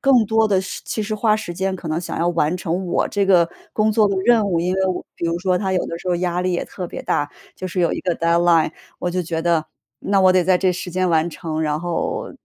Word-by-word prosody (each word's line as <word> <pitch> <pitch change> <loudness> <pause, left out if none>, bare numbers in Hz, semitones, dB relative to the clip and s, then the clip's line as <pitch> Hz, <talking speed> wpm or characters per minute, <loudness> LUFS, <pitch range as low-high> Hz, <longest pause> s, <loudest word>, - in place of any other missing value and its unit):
更 260 -5 +4
多 220 0 +2
的 190 -2 +3
是 190 - -6
其 215 - -2
实 215 +1 -3
花 215 0 +2
时 215 -5 -5
间 190 +1 -1
可 170 - -10
能 155 +2 -1
想 175 - -5
要 170 +1 +1
完 165 -1 +1
成 180 +1 -2
我 175 - +1
这 200 -1 0
个 175 -3 +5 0.3
工 215 0 +2
作 210 -1 +4
的 195 - -1
任 230 -4 +4
务， 170 -3 +1
因 180 +2 0
为 190 - 0 0.3
比 170 - -3
如 170 +1 -1
说 185 0 +1
它 190 -2 -1
有 185 - +1
的 165 - -5
时 185 - -6
候 175 - +2
压 180 0 -1
力 185 0 0
也 175 - -1
特 180 -2 -6
别 - - -7
大。 145 0 -1 0.2
就 185 - -6
是 180 - -5
有 170 - +2
一 - - -3
个 180 -2 -1
deadline， 170 -1 +3 0.3
我 175 - -2
就 180 +1 -1
觉 165 -1 -3
得 170 -2 +2 0.4
那 200 0 +1
我 185 -1 +6
得 185 -1 +4
在 185 +1 +3
这 185 -1 +2
时 180 0 -5
间 185 +1 0
完 165 0 +2
成， 160 -1 -4
然 150 -1 0
后 175 -1 -2
180 Hz, 325 characters per minute, -21 LUFS, 170-195 Hz, 0.4 s, 我